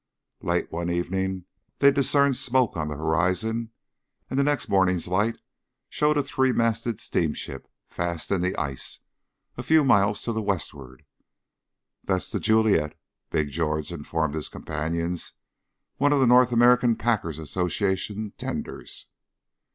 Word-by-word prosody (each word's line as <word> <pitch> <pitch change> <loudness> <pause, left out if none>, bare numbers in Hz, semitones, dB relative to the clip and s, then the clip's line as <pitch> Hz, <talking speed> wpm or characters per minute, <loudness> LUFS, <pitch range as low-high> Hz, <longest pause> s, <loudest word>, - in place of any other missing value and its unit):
Late - - -1
one 85 +1 -3
evening 95 +1 -2 0.3
they 140 0 +6
discerned 140 0 +3
smoke 125 -1 +1
on 80 -2 -2
the 75 - -4
horizon, 95 +9 0 0.6
and 130 - 0
the - - +4
next 145 0 0
morning's 95 -3 +2
light 100 +6 +1 0.5
showed 150 0 +2
a 145 - +2
three 130 -2 +1
masted 115 -1 0
steamship 75 -9 -2 0.2
fast 85 -2 -3
in 95 -3 +1
the 90 +1 0
ice, 70 -4 -3 0.6
a - - -3
few 155 +4 +4
miles 100 -6 +3
to 115 - -2
the 110 - -1
westward. 70 - -4 1.0
"That's 95 -2 -1
The - - -1
Juliet," 110 -9 +2 0.3
Big 75 -2 -1
George 75 +1 -2
informed 80 -1 -2
his 80 -2 -3
companions, 85 +3 -3 0.6
"one 145 +1 +3
of 145 - +3
the 130 - +4
North 125 0 +5
American 120 0 +5
Packers' 105 -11 -1
Association 95 +6 -2
tenders." - - -5
95 Hz, 135 wpm, -25 LUFS, 80-120 Hz, 1.0 s, they